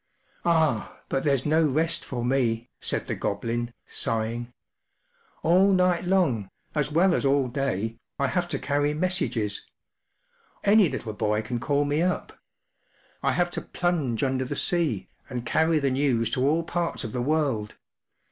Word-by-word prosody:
” -, -, -36 dB
“Ah, 160 Hz, -9 st, +2 dB
but 135 Hz, -, 0 dB
there’s 140 Hz, -4 st, +1 dB
no 155 Hz, +2 st, +3 dB
rest 160 Hz, +3 st, +1 dB
for 120 Hz, -2 st, -4 dB
me,” 120 Hz, -2 st, 0 dB
said -, -, -2 dB
the -, -, -3 dB
Goblin, 115 Hz, +4 st, -2 dB
sighing. 115 Hz, +2 st, -2 dB, 0.5 s
“ -, -, -37 dB
All 185 Hz, +4 st, +5 dB
night 180 Hz, -1 st, +2 dB
long, 150 Hz, -, +1 dB, 0.2 s
as 150 Hz, -1 st, 0 dB
well 175 Hz, +4 st, +4 dB
as -, -, +1 dB
all 140 Hz, -1 st, +3 dB
day, 115 Hz, -4 st, -2 dB, 0.2 s
I 140 Hz, -, +1 dB
have 175 Hz, +5 st, 0 dB
to -, -, -2 dB
carry 145 Hz, +1 st, 0 dB
messages. 150 Hz, -, -1 dB, 1.0 s
Any 200 Hz, -3 st, +5 dB
little 110 Hz, -, -4 dB
boy 105 Hz, 0 st, 0 dB
can 120 Hz, +1 st, -3 dB
call 145 Hz, +3 st, +1 dB
me 145 Hz, +2 st, +1 dB
up. 180 Hz, +1 st, -1 dB, 0.9 s
I -, -, +2 dB
have 175 Hz, -1 st, +1 dB
to -, -, -3 dB
plunge 155 Hz, -10 st, -1 dB
under 130 Hz, -1 st, +1 dB
the 130 Hz, -, -4 dB
sea, 150 Hz, -, 0 dB, 0.2 s
and 125 Hz, -2 st, -4 dB
carry 160 Hz, +5 st, +2 dB
the 140 Hz, -3 st, +1 dB
news 130 Hz, -4 st, +1 dB
to 130 Hz, +2 st, +1 dB
all 160 Hz, +3 st, +2 dB
parts 170 Hz, 0 st, -2 dB
of 110 Hz, -, -5 dB
the 125 Hz, -, -1 dB
world. 135 Hz, -7 st, 0 dB
140 Hz, 165 wpm, -26 LUFS, 120-165 Hz, 1.0 s, All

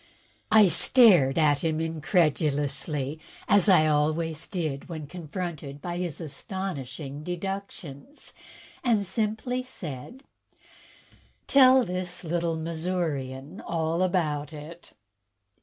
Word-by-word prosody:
I 215 Hz, -2 st, +7 dB
stared 175 Hz, -, +6 dB
at 150 Hz, 0 st, +3 dB
him 160 Hz, -1 st, 0 dB
incredulously, 150 Hz, -3 st, 0 dB, 0.3 s
as 205 Hz, -1 st, +5 dB
I 180 Hz, -5 st, +6 dB
always 155 Hz, +1 st, 0 dB
did 155 Hz, -5 st, -4 dB
when 160 Hz, -3 st, -6 dB
confronted 155 Hz, -3 st, -6 dB
by 175 Hz, +3 st, -5 dB
his 175 Hz, -5 st, -4 dB
astonishing 150 Hz, -3 st, -6 dB
"deductions," 190 Hz, -, -6 dB, 0.5 s
and 220 Hz, -5 st, +2 dB
simply 220 Hz, +5 st, -2 dB
said: 240 Hz, -, -8 dB, 1.2 s
"Tell 260 Hz, -2 st, +6 dB
this 180 Hz, -1 st, -5 dB
little 170 Hz, 0 st, -1 dB
Missourian 160 Hz, -5 st, -3 dB
all 165 Hz, +1 st, -1 dB
about 155 Hz, -5 st, 0 dB
it." 155 Hz, +3 st, -11 dB
165 Hz, 95 wpm, -27 LUFS, 150-185 Hz, 1.2 s, I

